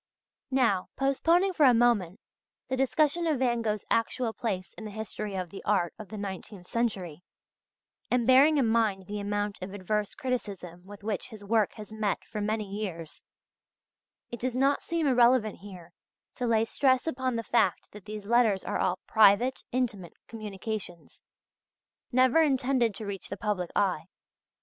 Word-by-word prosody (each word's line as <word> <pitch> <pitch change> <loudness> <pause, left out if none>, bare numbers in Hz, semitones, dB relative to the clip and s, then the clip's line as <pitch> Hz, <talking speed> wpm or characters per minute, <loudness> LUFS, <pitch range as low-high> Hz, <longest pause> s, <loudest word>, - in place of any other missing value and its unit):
Now, 235 -8 +2
postponing 330 +8 +2
for 315 - +2
a 250 - +6
moment, 230 -5 +2 0.5
the 260 - 0
discussion 300 +5 +1
of 310 -3 +1
Van 240 -2 +1
Gogh's 215 -2 -2
actual 230 0 0
place 190 -7 -4
in - - -10
the - - -5
history 210 -1 -5
of 185 -2 -4
the 195 - -9
art 190 -5 +1
of 215 - -9
the 215 - -7
nineteenth 195 -1 -7
century, 190 -9 -2 0.9
and 245 -1 +2
bearing 275 +5 +6
in 270 - +3
mind 220 -4 +1
the 205 +2 -5
amount 205 0 -2
of 190 +2 -6
adverse 205 +2 -2
criticism 195 -9 -4
with 205 0 -12
which 210 +1 -3
his 215 -3 -11
work 215 -1 +2
has 215 0 -10
met 210 -3 -1
for 210 - -5
many 215 0 -1
years, 190 -6 -6 1.1
it 240 - -6
does 255 0 -2
not 275 +2 +2
seem 335 -2 -1
irrelevant 245 -4 +3
here 180 -3 -11 0.4
to 250 - -3
lay 225 -1 +3
stress 260 +2 +2
upon 260 -5 -1
the 230 - -2
fact 235 0 +1
that 210 -2 -12
these 210 -1 -7
letters 220 -3 +3
are - - -2
all 180 - +1
private, 220 +4 +4
intimate 220 -9 -2
communications, 210 -4 -6 0.9
never 255 +5 +4
intended 260 -6 +2
to 215 - -6
reach 200 -2 -6
the 200 - -5
public 195 -4 -2
eye. 190 -6 +1
220 Hz, 165 wpm, -28 LUFS, 200-250 Hz, 1.1 s, a